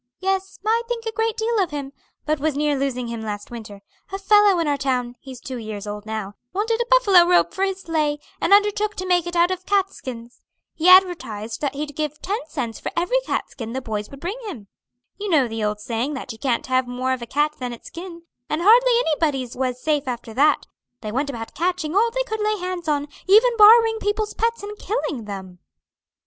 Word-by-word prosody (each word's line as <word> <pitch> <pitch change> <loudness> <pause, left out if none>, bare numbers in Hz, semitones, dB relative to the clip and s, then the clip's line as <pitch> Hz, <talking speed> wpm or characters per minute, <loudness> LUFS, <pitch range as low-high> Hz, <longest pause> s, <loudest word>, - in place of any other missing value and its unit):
Yes, 385 0 -1
I 450 +2 +3
think 470 -1 -4
a 450 - -2
great 450 0 -1
deal 455 0 0
of 370 -4 +1
him, 280 -2 -6 0.3
but 305 -1 0
was 300 -1 -1
near 295 0 +1
losing 260 -3 -2
him 230 -1 -5
last 210 -1 -6
winter. 210 -4 -9 0.3
A 390 - -2
fellow 405 -1 +5
in 335 -2 0
our 290 - +2
town 255 -3 -1
he's 260 -2 -10
two 260 0 -6
years 215 -2 -6
old 210 0 -6
now 215 -2 -4 0.2
wanted 450 +4 0
a 475 - -2
buffalo 405 -8 +6
robe 355 +1 +3
for 385 - -1
his 385 -1 -1
sleigh, 305 -3 0 0.2
and - - 0
undertook 415 +1 +3
to 370 - -4
make 355 -2 +2
it 345 - -5
out 345 +1 +4
of 370 0 -5
cat 395 -1 +2
skins. 240 -2 -9 0.3
He 335 +3 +2
advertised 330 - +3
that 280 -2 -1
he'd 290 0 -5
give 300 -1 -3
ten 410 +4 -2
cents 250 -8 -4
for - - -4
every 360 +9 +2
cat - - -2
skin 230 -3 -7
the 260 - -2
boys 210 -3 -4
would 275 - -11
bring 375 - -4
him. 225 - -8 0.5
You 410 0 -3
know 295 -8 +4
the 225 -1 -4
old 210 0 -1
saying 235 +6 -2
that 260 - -6
you 225 - -10
can't 255 -4 0
have 255 -1 +1
more 255 +1 -1
of 255 - -4
a 235 - -6
cat 295 +4 0
than 250 -1 -4
its 235 - -10
skin, 340 0 -9 0.3
and 305 - -1
hardly 485 +5 +6
anybody's 290 -6 0
was 255 -1 -2
safe 295 -1 0
after 235 -2 -5
that; 290 +5 +3 0.4
they 215 - -5
went 275 +5 -1
about 230 -4 -6
catching 350 -1 -1
all 450 +3 +4
they - - -1
could 440 -3 -4
lay 425 0 +1
hands 360 -2 -5
on, 290 -1 0 0.2
even 455 +5 +6
borrowing 450 +1 +7
people's 420 0 -1
pets 460 -1 -1
and 415 0 -7
killing 320 - -3
them." 190 -3 -8
305 Hz, 220 wpm, -22 LUFS, 250-395 Hz, 0.5 s, borrowing